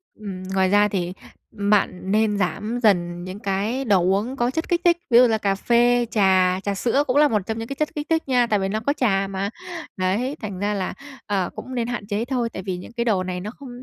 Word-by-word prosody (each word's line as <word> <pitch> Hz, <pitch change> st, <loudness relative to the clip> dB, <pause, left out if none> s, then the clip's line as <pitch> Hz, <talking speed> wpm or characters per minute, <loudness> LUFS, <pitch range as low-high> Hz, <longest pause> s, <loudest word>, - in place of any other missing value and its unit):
Ừm, 195 Hz, -3 st, -7 dB
ngoài 190 Hz, 0 st, +1 dB
ra 205 Hz, +1 st, +5 dB
thì 180 Hz, -3 st, -2 dB, 0.4 s
bạn 200 Hz, -2 st, 0 dB
nên 215 Hz, -1 st, +2 dB
giảm 210 Hz, +6 st, -2 dB
dần 175 Hz, -4 st, +2 dB
những 185 Hz, +2 st, -7 dB
cái 210 Hz, +6 st, -1 dB
đồ 200 Hz, -5 st, +4 dB
uống 200 Hz, +8 st, 0 dB
có 240 Hz, -1 st, 0 dB
chất 320 Hz, +4 st, -3 dB
kích 345 Hz, -1 st, +1 dB
thích, 345 Hz, -1 st, +5 dB
ví 235 Hz, -, +6 dB
dụ 250 Hz, -, +7 dB
là 220 Hz, -, +1 dB
cà 200 Hz, -2 st, 0 dB
phê, 240 Hz, +3 st, +3 dB
trà, 190 Hz, -3 st, +3 dB
trà 200 Hz, -1 st, -2 dB
sữa 245 Hz, +8 st, +1 dB
cũng 255 Hz, +2 st, +1 dB
là 295 Hz, 0 st, +6 dB
một 215 Hz, -6 st, +1 dB
trong 220 Hz, -, -2 dB
những 225 Hz, -, -5 dB
cái 275 Hz, -, -5 dB
chất 305 Hz, +2 st, -2 dB
kích 295 Hz, +1 st, -4 dB
thích 325 Hz, 0 st, +2 dB
nha, 245 Hz, -2 st, +3 dB
tại 210 Hz, -3 st, +1 dB
vì 190 Hz, -, -1 dB
nó 215 Hz, +2 st, -1 dB
có 280 Hz, +6 st, 0 dB
trà 195 Hz, -6 st, +1 dB
mà. 195 Hz, +1 st, -2 dB, 0.5 s
Đấy, 205 Hz, +9 st, 0 dB
thành 200 Hz, -4 st, -5 dB
ra 205 Hz, +1 st, 0 dB
là, 195 Hz, -2 st, -2 dB, 0.3 s
ờ, 195 Hz, -4 st, -1 dB
cũng 255 Hz, -, -7 dB
nên 235 Hz, -2 st, -1 dB
hạn 240 Hz, -4 st, -4 dB
chế 210 Hz, +2 st, -1 dB
thôi, 245 Hz, -2 st, -1 dB
tại 190 Hz, -, -6 dB
vì 185 Hz, -2 st, -3 dB
những 180 Hz, -, -10 dB
cái 235 Hz, 0 st, -2 dB
đồ 200 Hz, -6 st, +2 dB
này 180 Hz, -1 st, -4 dB
nó 210 Hz, +3 st, -5 dB
không 275 Hz, -, -9 dB
210 Hz, 250 wpm, -23 LUFS, 190-240 Hz, 0.5 s, dụ